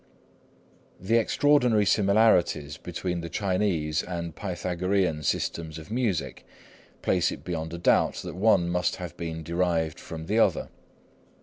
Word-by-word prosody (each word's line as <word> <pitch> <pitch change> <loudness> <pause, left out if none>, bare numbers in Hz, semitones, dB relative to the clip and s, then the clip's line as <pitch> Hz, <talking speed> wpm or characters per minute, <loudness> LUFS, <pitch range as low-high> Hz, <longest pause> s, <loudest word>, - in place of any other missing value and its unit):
The 110 +6 +2
extraordinary 125 -3 +3
similarities 100 -8 +3
between 90 -2 -4
the 85 - -6
Chinese 90 -5 0
and 85 -2 -5
Pythagorean 90 -2 -1
systems 80 +2 -2
of 80 +6 -11
music 100 - -1 0.6
place - - +2
it - - -8
beyond 80 -2 -4
a 85 - -5
doubt 85 - +3
that - - -7
one 95 -3 +3
must 90 0 0
have 90 -2 -7
been 80 -1 -5
derived 85 -1 -1
from 80 -1 -8
the 105 +6 +1
other. - - +2
90 Hz, 130 wpm, -27 LUFS, 80-100 Hz, 0.6 s, extraordinary